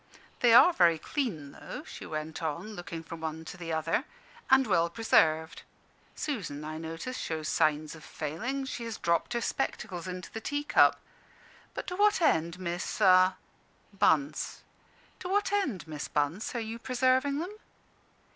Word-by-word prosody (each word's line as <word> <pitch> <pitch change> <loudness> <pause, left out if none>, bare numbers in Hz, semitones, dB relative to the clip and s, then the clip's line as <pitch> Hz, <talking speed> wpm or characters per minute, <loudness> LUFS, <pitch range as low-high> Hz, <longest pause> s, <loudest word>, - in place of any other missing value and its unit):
"They 240 - +5
are 245 +10 +8
very 170 - +4
clean, 160 - -3
though," - - -8
she - - -9
went 155 +1 -5
on, 170 +7 -3
looking 175 -3 -7
from 165 0 -9
one 160 0 -4
to - - -8
the 170 -2 -6
other, 160 - 0 0.4
"and 265 0 +6
well 170 -6 +2
preserved. 160 -6 +2 0.5
Susan, 180 - -4
I 155 +1 -5
notice, 165 +10 -5
shows 155 -1 -3
signs 155 -1 +1
of 160 -1 -12
failing; 230 - -4
she 245 - -5
has 230 -2 -5
dropped 170 +6 0
her 235 - -1
spectacles 185 -9 -3
into 180 0 -6
the 225 - -6
teacup. 290 +5 +3 0.8
But - - -4
to 360 - -4
what 415 +2 +4
end, 170 - +2
Miss 175 +2 -3 0.5
" - - -35
"Bunce." 155 -6 +1 0.6
"To 360 - -6
what 405 +1 +1
end, 290 - -1
Miss 150 -2 -5
Bunce, 150 - -1
are - - 0
you 225 +1 -5
preserving 260 +3 +2
them?" 355 +7 -4
175 Hz, 155 wpm, -29 LUFS, 160-255 Hz, 0.8 s, are